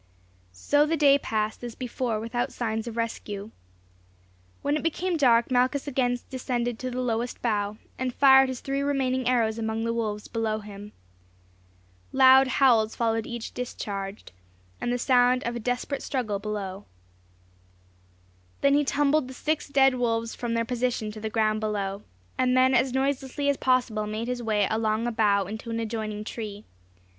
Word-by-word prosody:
So 290 Hz, -, +2 dB
the 325 Hz, +1 st, 0 dB
day 280 Hz, -1 st, +5 dB
passed 215 Hz, -2 st, -2 dB
as 240 Hz, -2 st, -6 dB
before 245 Hz, -3 st, -2 dB
without 240 Hz, +3 st, -2 dB
signs 225 Hz, -1 st, -3 dB
of 235 Hz, -1 st, -6 dB
rescue. 215 Hz, -2 st, -4 dB, 1.1 s
When 285 Hz, +1 st, +1 dB
it 305 Hz, -, -1 dB
became 350 Hz, +2 st, -1 dB
dark 240 Hz, -5 st, +3 dB
Malchus 255 Hz, +3 st, +1 dB
again 250 Hz, -3 st, +1 dB
descended 245 Hz, -2 st, -2 dB
to 255 Hz, -, -3 dB
the 250 Hz, 0 st, -3 dB
lowest 235 Hz, 0 st, -2 dB
bough, 210 Hz, -3 st, 0 dB, 0.2 s
and 255 Hz, -1 st, -1 dB
fired 265 Hz, 0 st, +6 dB
his 255 Hz, -2 st, -5 dB
three 275 Hz, 0 st, -2 dB
remaining 260 Hz, -3 st, 0 dB
arrows 230 Hz, -3 st, +1 dB
among 220 Hz, 0 st, -2 dB
the 230 Hz, 0 st, -1 dB
wolves 215 Hz, -3 st, -3 dB
below 225 Hz, -2 st, -1 dB
him. 205 Hz, 0 st, -10 dB, 1.2 s
Loud 265 Hz, 0 st, +7 dB
howls 235 Hz, -5 st, +3 dB
followed 225 Hz, -1 st, 0 dB
each 235 Hz, -1 st, -6 dB
discharge, 200 Hz, -5 st, -5 dB, 0.6 s
and 240 Hz, -, -1 dB
the 245 Hz, -, +1 dB
sound 250 Hz, 0 st, +3 dB
of 235 Hz, 0 st, -3 dB
a -, -, -3 dB
desperate 250 Hz, +4 st, -2 dB
struggle 220 Hz, -7 st, -2 dB
below. 200 Hz, -2 st, -5 dB, 1.8 s
Then 280 Hz, 0 st, +4 dB
he 290 Hz, +1 st, +4 dB
tumbled 290 Hz, 0 st, +1 dB
the 260 Hz, -, -9 dB
six 305 Hz, +4 st, -1 dB
dead 270 Hz, -1 st, +4 dB
wolves 230 Hz, -2 st, -1 dB
from 235 Hz, -1 st, -3 dB
their 230 Hz, 0 st, 0 dB
position 245 Hz, -3 st, -1 dB
to 215 Hz, -, -9 dB
the 220 Hz, +1 st, -3 dB
ground 215 Hz, -1 st, +1 dB
below, 205 Hz, -2 st, -2 dB, 0.4 s
and 255 Hz, 0 st, +3 dB
then 260 Hz, +1 st, +5 dB
as 260 Hz, +1 st, +3 dB
noiselessly 270 Hz, +1 st, -1 dB
as 280 Hz, -, +1 dB
possible 245 Hz, -5 st, +1 dB
made 215 Hz, +2 st, -4 dB
his 250 Hz, -1 st, -3 dB
way 215 Hz, -3 st, +1 dB
along 220 Hz, +1 st, 0 dB
a 240 Hz, -, 0 dB
bough 205 Hz, -3 st, +2 dB
into 220 Hz, +4 st, -7 dB
an 230 Hz, 0 st, -2 dB
adjoining 215 Hz, -2 st, -4 dB
tree. 215 Hz, -2 st, -7 dB
235 Hz, 165 wpm, -26 LUFS, 220-260 Hz, 1.8 s, Loud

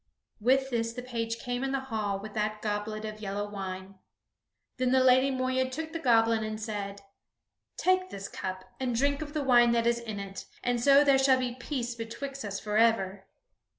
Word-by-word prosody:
With 265 Hz, +4 st, +2 dB
this 230 Hz, -1 st, -1 dB
the 250 Hz, +1 st, -6 dB
page 230 Hz, -2 st, -3 dB
came 245 Hz, +2 st, -3 dB
in 270 Hz, 0 st, -1 dB
the 270 Hz, -, +1 dB
hall 220 Hz, -6 st, -2 dB
with 210 Hz, +1 st, -8 dB
that 215 Hz, 0 st, -2 dB
goblet 215 Hz, +1 st, -2 dB
of 215 Hz, 0 st, -6 dB
yellow 205 Hz, 0 st, -3 dB
wine. 190 Hz, -1 st, -6 dB, 0.8 s
Then 255 Hz, -1 st, +1 dB
the 260 Hz, 0 st, +5 dB
Lady 260 Hz, +1 st, +5 dB
Moeya 260 Hz, 0 st, 0 dB
took 315 Hz, +4 st, -5 dB
the 330 Hz, -, -3 dB
goblet 230 Hz, -4 st, +3 dB
and 215 Hz, 0 st, -4 dB
said: 200 Hz, -2 st, -5 dB, 0.7 s
"Take 370 Hz, 0 st, +2 dB
this 195 Hz, 0 st, -6 dB
cup, 185 Hz, 0 st, -5 dB
and 250 Hz, -2 st, -1 dB
drink 280 Hz, +4 st, +1 dB
of 295 Hz, -1 st, -6 dB
the 300 Hz, -, 0 dB
wine 240 Hz, -3 st, +5 dB
that 230 Hz, -1 st, +2 dB
is 235 Hz, 0 st, +2 dB
in 220 Hz, -3 st, -6 dB
it, 195 Hz, -1 st, -7 dB, 0.2 s
and 245 Hz, -1 st, 0 dB
so 280 Hz, +3 st, +7 dB
there 275 Hz, -2 st, +5 dB
shall 265 Hz, -1 st, +5 dB
be 250 Hz, -1 st, -2 dB
peace 245 Hz, -1 st, -3 dB
betwixt 235 Hz, +4 st, -6 dB
us 200 Hz, -1 st, -4 dB
forever." 210 Hz, -3 st, +1 dB
235 Hz, 190 wpm, -29 LUFS, 210-260 Hz, 0.8 s, so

